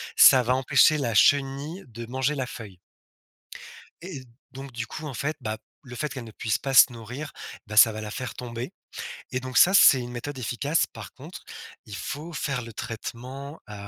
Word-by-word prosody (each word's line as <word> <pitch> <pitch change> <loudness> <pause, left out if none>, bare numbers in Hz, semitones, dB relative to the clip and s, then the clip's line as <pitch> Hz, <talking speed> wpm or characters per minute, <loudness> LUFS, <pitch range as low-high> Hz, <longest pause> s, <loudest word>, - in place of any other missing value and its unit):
ça 130 - +8
va 125 +2 +2
empêcher 135 +3 +4
la 125 -6 -1
chenille 140 - +2
de 115 0 -8
manger 130 +4 0
la 130 -3 -3
feuille 100 -7 -10 1.2
et 170 -7 -7 0.3
donc, 135 +1 -9
du 120 -1 -5
coup, 155 - -7
en 140 - -6
fait, 145 +5 -3
bah, 110 -2 -3 0.3
le 125 -3 -10
fait 150 +3 -3
qu'elle 130 -2 -6
ne 110 - -10
puisse 110 0 -1
pas 135 - -3
se 125 - +8
nourrir, 125 +7 -7 0.4
bah, 105 +1 -6
ça 110 - +9
va 110 0 -6
la 105 -1 -6
faire 125 0 -5
tomber 120 0 -6 0.6
et 130 - -1
donc 130 -1 -3
ça, 190 - +7
c'est 140 -9 +8
une 120 0 -6
méthode 130 +3 -6
efficace. 135 +6 0
Par - - -10
contre, - - -11 0.4
il 105 - -8
faut 150 +10 -6
faire 135 -4 -2
le 115 -1 -9
traitement, 130 +7 -7
heu, - - -8
130 Hz, 195 wpm, -26 LUFS, 115-140 Hz, 1.2 s, ça